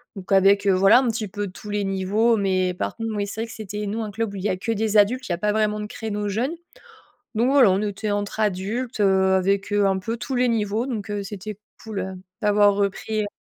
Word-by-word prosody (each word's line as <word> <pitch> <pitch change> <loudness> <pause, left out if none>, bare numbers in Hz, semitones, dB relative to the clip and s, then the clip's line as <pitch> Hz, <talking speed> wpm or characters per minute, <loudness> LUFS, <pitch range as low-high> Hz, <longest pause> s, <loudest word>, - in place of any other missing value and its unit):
Donc 195 0 -9
avec, 195 +1 +5
heu, 195 - +5
voilà 195 +6 +6
un 265 - 0
petit 220 -2 -2
peu 205 +1 -4
tous 200 +3 -10
les 205 0 -1
niveaux 195 +4 +2
mais 185 -2 +1
par - - -3
contre, 225 -2 -3
oui 205 0 -1
c'est 215 +2 -5
vrai 230 - -3
que - - -10
c'était 210 -1 -5
nous 220 +3 -2
un 210 - -5
club 220 -1 -3
où - - -6
il 185 - -6
y 210 - +1
a 185 - -1
que 225 +5 -3
des 220 0 +1
adultes, 250 +6 +3
il - - -2
y - - +1
a - - -9
pas 210 +1 +1
vraiment 215 -1 +1
de 210 - -4
créneau 210 -1 -4
jeunes. 235 +8 -1 0.8
Donc 240 +4 +2
voilà, 270 -6 +6
on 190 +2 +1
était 210 0 -2
entre 205 +1 -3
adultes, 215 +5 -2
heu, 190 -1 +3
avec, 195 +2 0
heu, 205 -1 +3
un 190 - +1
peu 225 +5 -4
tous 260 +3 -4
les 250 0 +3
niveaux, 220 0 0
donc, 220 -4 -4
heu, 205 -1 -2
c'était 205 +1 -7 0.3
cool, 220 -3 -5
heu, 190 - -5 0.3
d'avoir 205 -1 +4
repris, 205 +2 -1
heu. 205 - -3
205 Hz, 260 wpm, -23 LUFS, 195-220 Hz, 0.8 s, voilà